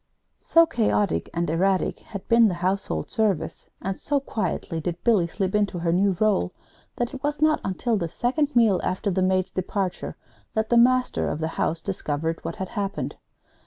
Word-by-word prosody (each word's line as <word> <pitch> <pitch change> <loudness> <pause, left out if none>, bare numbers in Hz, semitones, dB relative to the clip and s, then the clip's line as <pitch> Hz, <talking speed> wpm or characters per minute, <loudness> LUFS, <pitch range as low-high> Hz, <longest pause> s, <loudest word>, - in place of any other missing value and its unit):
So 330 0 +5
chaotic 215 - 0
and 170 0 -1
erratic 185 +4 +1
had 200 -3 -9
been 230 -1 +6
the 185 - -1
household 180 - -2
service, 200 -8 -1
and 195 0 -3
so 285 -1 0
quietly 185 -9 -3
did 175 +2 -4
Billy 210 -8 +3
slip 190 +2 -2
into 205 -3 +1
her 170 -1 0
new 190 0 +2
role, 210 - +2 0.4
that 240 -1 -2
it 265 - -7
was 295 +1 -1
not 310 0 +3
until 220 +4 0
the 170 -4 -1
second 280 - -1
meal 220 -6 +4
after 190 +2 -1
the 185 +1 0
maid's 185 0 +1
departure 185 0 -3 0.4
that 220 0 0
the 240 - +3
master 255 +1 +3
of - - -2
the 160 +1 -2
house 165 0 -1
discovered 165 -4 -3
what - - -4
had 190 -3 -5
happened. 200 0 -3
195 Hz, 180 wpm, -25 LUFS, 175-230 Hz, 0.4 s, been